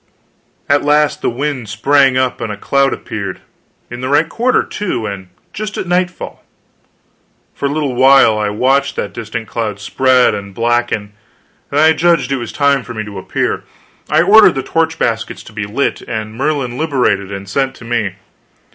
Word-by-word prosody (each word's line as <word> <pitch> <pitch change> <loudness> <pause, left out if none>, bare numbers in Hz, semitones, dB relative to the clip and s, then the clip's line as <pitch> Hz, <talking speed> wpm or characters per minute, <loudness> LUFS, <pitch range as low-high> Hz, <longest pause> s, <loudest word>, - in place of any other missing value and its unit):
At 145 0 +3
last 150 0 +2
the - - +1
wind 130 -2 -3
sprang 135 +4 +3
up 130 -1 0
and 110 - -3
a 105 - -6
cloud 140 +5 +1
appeared 100 -4 -5 0.5
in 120 +1 -6
the 130 - -3
right 145 +3 +3
quarter, 245 +8 +1
too, 185 - -3
and 100 -2 -6 0.3
just 210 0 -5
at - - -3
nightfall. 180 0 -2 1.1
For 140 - -2
a - - -2
little 145 -3 -1
while 130 -2 +6
I 105 -1 -1
watched 135 +6 +1
that - - -4
distant 115 0 -5
cloud 105 -3 -3
spread 130 +4 +3
and 100 -2 -7
blacken, 115 -3 0 0.6
then 145 - 0
I 160 +1 +6
judged 160 -5 +2
it 135 - +1
was 120 -2 -5
time 140 -1 +2
for 120 -1 -9
me 110 - -3
to 100 -2 -7
appear. 95 - -2 0.5
I - - +4
ordered 200 0 +7
the 135 - -2
torch 165 0 0
baskets 115 -5 -2
to - - -14
be 105 -1 -4
lit, 130 +7 -1
and 110 -1 -5
Merlin 135 -1 -2
liberated 125 -11 0
and 100 0 -6
sent 135 +6 -1
to 115 - -13
me. 115 -5 -1
130 Hz, 180 wpm, -16 LUFS, 110-145 Hz, 1.1 s, ordered